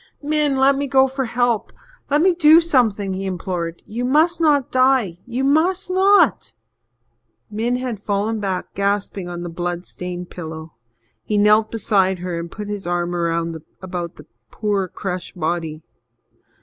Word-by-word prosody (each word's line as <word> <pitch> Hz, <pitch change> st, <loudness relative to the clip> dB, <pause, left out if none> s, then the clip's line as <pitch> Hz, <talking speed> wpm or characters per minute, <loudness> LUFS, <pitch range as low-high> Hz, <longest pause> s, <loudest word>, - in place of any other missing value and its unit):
"Min, 300 Hz, -1 st, +1 dB
let 270 Hz, +1 st, +4 dB
me 280 Hz, +1 st, -2 dB
go 265 Hz, 0 st, +5 dB
for 265 Hz, 0 st, -3 dB
help 240 Hz, -1 st, 0 dB, 0.4 s
let 295 Hz, +3 st, +3 dB
me 370 Hz, 0 st, +5 dB
do 320 Hz, -1 st, +7 dB
something," 225 Hz, -, +1 dB
he 195 Hz, +1 st, -4 dB
implored. 175 Hz, -2 st, -4 dB
"You 235 Hz, +3 st, -4 dB
must 315 Hz, +7 st, +2 dB
not 290 Hz, -5 st, +2 dB
die 255 Hz, -9 st, +2 dB
you 250 Hz, +2 st, -2 dB
must 330 Hz, +7 st, +2 dB
not!" 375 Hz, -, +3 dB, 1.0 s
Min 230 Hz, +4 st, -1 dB
had 250 Hz, -4 st, -3 dB
fallen 205 Hz, +2 st, -1 dB
back, 190 Hz, -3 st, -3 dB
gasping, 200 Hz, -2 st, -1 dB
on 175 Hz, 0 st, -6 dB
the -, -, -4 dB
blood 175 Hz, +1 st, -4 dB
stained 180 Hz, 0 st, -7 dB
pillow. 160 Hz, -2 st, -8 dB, 0.5 s
He 210 Hz, -, -1 dB
knelt 210 Hz, +1 st, +4 dB
beside 195 Hz, -4 st, +1 dB
her 175 Hz, -1 st, -4 dB
and 170 Hz, 0 st, -6 dB
put 210 Hz, -1 st, -7 dB
his 205 Hz, -3 st, -5 dB
arm 175 Hz, 0 st, -1 dB
about 170 Hz, +1 st, -4 dB
the -, -, -14 dB, 0.2 s
poor, 205 Hz, -3 st, -1 dB
crushed 180 Hz, -1 st, -6 dB
body. 160 Hz, -1 st, -2 dB
205 Hz, 150 wpm, -20 LUFS, 175-265 Hz, 1.0 s, do